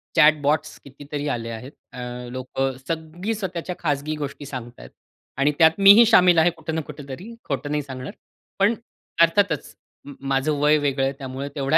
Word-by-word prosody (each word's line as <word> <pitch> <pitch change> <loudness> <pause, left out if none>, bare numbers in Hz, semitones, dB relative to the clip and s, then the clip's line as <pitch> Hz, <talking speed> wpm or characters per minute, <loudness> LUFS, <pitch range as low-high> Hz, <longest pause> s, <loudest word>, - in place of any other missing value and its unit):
Chat 150 0 +5
bots 155 +2 0
कितीतरी 145 +1 -6
आले 115 -4 -3
आहेत. 115 +4 -7 0.2
अ, - - -8 0.3
लोक 130 +1 -7 0.3
सगळी 165 +6 -3
स्वतःच्या 180 -3 -4
खाजगी 150 -1 -1
गोष्टी 145 -1 -6
सांगत 125 -4 -8
आहेत. - - -11 0.5
आणि 140 +2 +3
त्यात 160 -1 +7
मीही 200 +4 +8
शामिल 180 -6 +6
आहे 160 +2 +5
कुठं 160 0 -5
ना 160 - 0
कुठेतरी 150 - -9
खोटं 140 +1 -3
नाही 150 0 0
सांगणार. 130 -1 -7 0.5
पण 200 +3 +4 0.5
अर्थातच 170 -1 +2 0.3
म 145 - -9 0.2
माझं 135 +3 +1
वय 150 +1 +4
वेगळं 140 -2 0
आहे 135 +1 0
त्यामुळं 135 +1 -5
तेवढा 140 +2 +2
150 Hz, 170 wpm, -23 LUFS, 135-165 Hz, 0.5 s, मीही